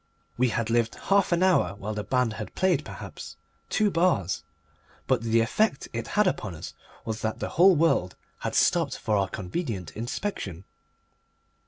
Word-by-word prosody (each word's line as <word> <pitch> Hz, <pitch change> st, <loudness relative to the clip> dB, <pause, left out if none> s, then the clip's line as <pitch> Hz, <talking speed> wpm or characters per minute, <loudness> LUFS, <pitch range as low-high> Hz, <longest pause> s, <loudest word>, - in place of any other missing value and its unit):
We 125 Hz, +1 st, +2 dB
had 115 Hz, 0 st, -1 dB
lived 115 Hz, 0 st, +1 dB
half 195 Hz, -2 st, +2 dB
an 175 Hz, +1 st, +3 dB
hour 135 Hz, -, +3 dB
while 105 Hz, +2 st, -5 dB
the 105 Hz, 0 st, -3 dB
band 125 Hz, +2 st, +1 dB
had 110 Hz, -1 st, -7 dB
played, 180 Hz, -6 st, +2 dB
perhaps, -, -, -9 dB, 0.3 s
two 210 Hz, -2 st, +2 dB
bars. 165 Hz, -, +1 dB, 0.6 s
But 130 Hz, -3 st, +2 dB
the 115 Hz, 0 st, +2 dB
effect 185 Hz, -, +1 dB
it 115 Hz, -1 st, -3 dB
had 210 Hz, -, +5 dB
upon 105 Hz, -, -1 dB
us 80 Hz, -, -8 dB, 0.3 s
was 110 Hz, 0 st, -3 dB
that 110 Hz, 0 st, -2 dB
the -, -, -4 dB
whole 185 Hz, +3 st, +6 dB
world 150 Hz, -, +2 dB, 0.2 s
had -, -, -3 dB
stopped -, -, +2 dB
for 110 Hz, -, 0 dB
our 100 Hz, -1 st, +2 dB
convenient 100 Hz, -, -4 dB
inspection. 110 Hz, -, -4 dB
115 Hz, 165 wpm, -27 LUFS, 105-175 Hz, 0.6 s, whole